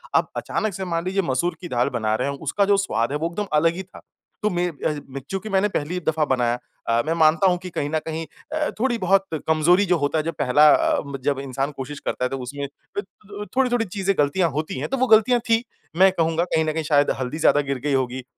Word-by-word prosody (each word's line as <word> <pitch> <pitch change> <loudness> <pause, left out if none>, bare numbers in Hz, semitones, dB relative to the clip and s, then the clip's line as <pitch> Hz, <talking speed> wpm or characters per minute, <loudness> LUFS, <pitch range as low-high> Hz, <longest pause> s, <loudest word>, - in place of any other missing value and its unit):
अब - - +3
अचानक 215 -2 -2
से 190 +2 -4
मान 170 -1 -2
लीजिए 190 +2 +1
मसूर 170 +8 0
की 180 - -6
दाल 120 0 +1
बना 110 -3 -1
रहे 125 - -1
हैं 140 - -3
उसका 180 +7 0
जो 200 0 +3
स्वाद 135 -11 0
है 145 - 0
वो 160 +2 -1
एकदम 205 +4 -3
अलग 165 +2 +3
ही 190 - -5
था। 185 - -15 0.4
तो 210 - +3
में 175 -2 0
अ, 150 -1 -3
मैं 135 +1 -6
चूँकि 195 +3 -4
मैंने 195 0 +2
पहली 175 0 -2
दफ़ा 160 -1 +2
बनाया 125 -3 +1 0.3
अ, 115 0 +3
मैं 160 - 0
मानता 160 +3 +4
हूँ 180 -1 +3
कि 180 +1 -8
कहीं 145 -4 -3
न 155 +1 0
कहीं 160 0 -4 0.3
अ, 310 -1 0
थोड़ी-बहुत 195 -6 +2 0.2
कमज़ोरी 165 +5 +4
जो 180 -2 +2
होता 145 +1 0
है - - +2
अ, - - -14
जब 165 - -2
पहला 150 +4 +5
अ, - - +2 0.2
जब 140 -1 0
इंसान 135 +1 -3
कोशिश 140 +2 -6
करता 125 - -2
है - - -1
तो 135 - -3
उसमें 140 +3 -5
अ, - - -5 0.3
थो 205 +1 -9
थोड़ी, 260 -1 +3
थोड़ी 240 -2 +1
चीज़ें 195 0 -1
गलतियाँ 155 +5 +2
होती 150 -1 -3
हैं 140 - -2
तो 270 - -1
वो 260 +1 +2
गलतियाँ 225 +2 +5
थी। 225 +1 +3 0.3
मैं 190 +1 +6
कहूँगा 165 -1 +1
कहीं 160 -3 +1
न 155 - 0
कहीं 160 0 -2
शायद 145 -1 +3
हल्दी 130 +4 -3
ज़्यादा 145 -2 +4
गिर 140 -1 -3
गई 145 - +1
होगी 130 -1 -1
160 Hz, 250 wpm, -23 LUFS, 140-195 Hz, 0.4 s, मैं